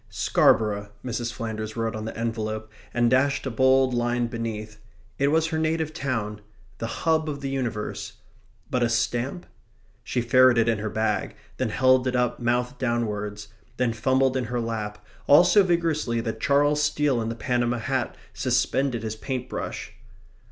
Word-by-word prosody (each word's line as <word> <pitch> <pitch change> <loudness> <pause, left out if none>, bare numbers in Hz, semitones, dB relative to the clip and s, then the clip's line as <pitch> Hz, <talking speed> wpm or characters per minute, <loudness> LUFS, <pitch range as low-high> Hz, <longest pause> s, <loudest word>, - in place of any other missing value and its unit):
"Scarborough," 105 -2 +2 0.2
Mrs. 120 -1 -2
Flanders 110 -2 -5
wrote 115 0 -1
on 110 0 -5
the 110 - -6
envelope, 110 -1 -3 0.2
and 120 0 +2
dashed 135 +4 +2
a 135 - -2
bold 130 +1 +4
line 120 0 +1
beneath; 110 -2 -5 0.4
it 140 - +3
was 160 +2 +3
her 160 -1 -1
native 160 0 0
town; 110 -8 -3 0.4
the 115 - -2
hub 160 +5 0
of 140 -1 -5
the 135 -1 -3
universe. 120 -6 -3 0.6
But 125 - +1
a 120 - +3
stamp? 120 +7 -1 0.6
She - - -2
ferreted 120 -1 +5
in 115 -2 +1
her 110 +1 -3
bag; 110 0 -1 0.2
then 130 -3 0
held 130 +3 +3
it 130 - 0
up 125 -1 0
mouth 125 +2 0
downwards; 105 -4 -2 0.3
then 125 -2 +1
fumbled 130 +3 +2
in 130 -2 0
her 120 +2 -2
lap, 105 -2 -4 0.2
all 145 +5 +8
so 205 - +5
vigorously 165 -9 +1
that 115 -1 -4
Charles 145 +1 +3
Steele 150 -4 +1
in 110 - -2
the 115 - -4
Panama 120 +1 0
hat 130 +2 -2 0.2
suspended 125 -1 0
his 110 -1 -3
paint 125 +2 -4
brush. - - -5
120 Hz, 165 wpm, -25 LUFS, 110-135 Hz, 0.6 s, all